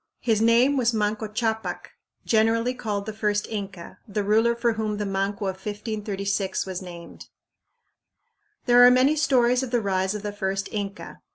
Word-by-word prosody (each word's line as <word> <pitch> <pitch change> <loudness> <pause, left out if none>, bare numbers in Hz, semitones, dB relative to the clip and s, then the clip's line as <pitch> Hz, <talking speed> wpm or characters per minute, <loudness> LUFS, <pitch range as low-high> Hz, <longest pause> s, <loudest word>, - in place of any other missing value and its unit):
His 220 -3 +1
name 240 +5 +4
was 240 -2 +1
Manco 215 +1 -1
Ccapac, 220 +1 -3 0.3
generally 230 +2 +2
called 210 -5 -4
the 220 - -5
first 210 -1 -1
Inca, 195 -5 -7
the 205 0 -2
ruler 225 +3 +3
for 235 0 +1
whom 215 -1 -2
the 210 - -2
Manco 195 +1 -2
of 190 -1 -3
1536 205 -1 -3
was 185 -1 -5
named. 175 -2 -11 1.4
There 245 0 +6
are 245 - +9
many 255 +4 +4
stories 255 -5 +3
of 260 - -4
the 240 0 +1
rise 190 -1 -1
of 210 - -6
the 205 -1 -4
first 195 -1 -2
Inca. 200 -1 -6
215 Hz, 165 wpm, -24 LUFS, 200-235 Hz, 1.4 s, are